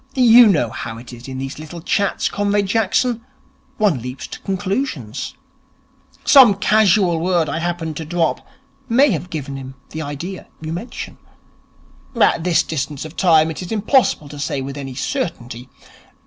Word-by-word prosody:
You 245 -2 +8
know 150 - +2
how 115 0 -6
it 120 +2 -11
is 120 +1 -11
in 130 -1 -6
these 135 +2 -5
little 155 +2 -8
chats, 200 +4 0
Comrade 205 0 0
Jackson. 225 +3 +1 0.5
One 195 - +2
leaps 125 +2 -6
to - - -9
conclusions. 190 - -3 0.9
Some 255 -8 +8
casual 195 -4 +3
word 170 -1 +1
I 150 +3 -2
happened 165 -3 -3
to 160 - -5
drop 170 +1 0 0.5
may 260 +4 +5
have 180 0 -3
given 140 -4 -5
him 135 0 -9 0.2
the 155 - -5
idea 155 +6 -6
you 160 0 -5
mention. 195 +9 -7 1.0
At 165 - +3
this 175 -2 +3
distance 145 -1 -4
of 155 +2 -10
time 160 -3 +4
it 160 - -6
is 180 - -7
impossible 220 - +2
to 145 0 -9
say 140 -1 -2
with 135 +1 -5
any 135 -3 -6
certainty. 125 - -4
165 Hz, 160 wpm, -19 LUFS, 140-200 Hz, 1.0 s, You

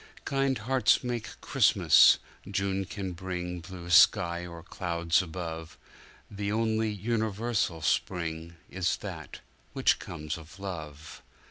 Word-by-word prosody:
Kind 135 -1 +1
hearts 125 +3 +2
make 120 -2 -4
Christmas—June 100 0 +3
can 95 -1 -5
bring 90 0 -5
blue 85 0 -9
sky 85 0 +5
or 85 -1 -10
clouds 85 -2 0
above; 80 -2 -6 0.5
The 100 0 -3
only 110 0 +1
universal 110 -4 -1
spring 85 -2 -1
is 90 -2 -1
that - - -8 0.3
which - - +2
comes 75 +1 -6
of 80 +4 -14
love. 80 -6 -7
90 Hz, 110 wpm, -29 LUFS, 85-105 Hz, 0.5 s, sky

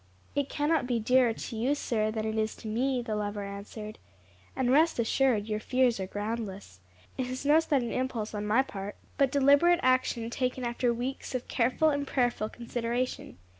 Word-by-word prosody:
"It 285 -1 -1
cannot 295 -2 +1
be 240 -2 +1
dearer 250 +2 +4
to 225 - -6
you, 250 +6 +1
sir, 220 -6 0
than 215 0 -3
it 220 0 -2
is 220 0 -1
to 225 - -9
me," 250 +3 0
the 220 -2 -3
lover 205 -1 -3
answered; 205 +2 -8 0.6
"and 255 -1 +1
rest 315 +5 +4
assured 235 -2 +2
your 215 -1 -1
fears 250 -1 +2
are 190 - -3
groundless. 205 - -5 0.4
It 255 - 0
is 255 +2 -5
no 300 +2 +6
sudden 275 -7 0
impulse 250 -4 -2
on 210 0 -3
my 230 +5 +4
part, 200 -4 -7 0.2
but 275 -2 +4
deliberate 285 +5 +5
action 255 -2 +1
taken 255 +1 -2
after 240 0 0
weeks 255 +3 -4
of 250 - -3
careful 255 +6 +2
and 285 -1 -2
prayerful 245 -5 0
consideration. 240 - -3
240 Hz, 180 wpm, -29 LUFS, 215-265 Hz, 0.6 s, no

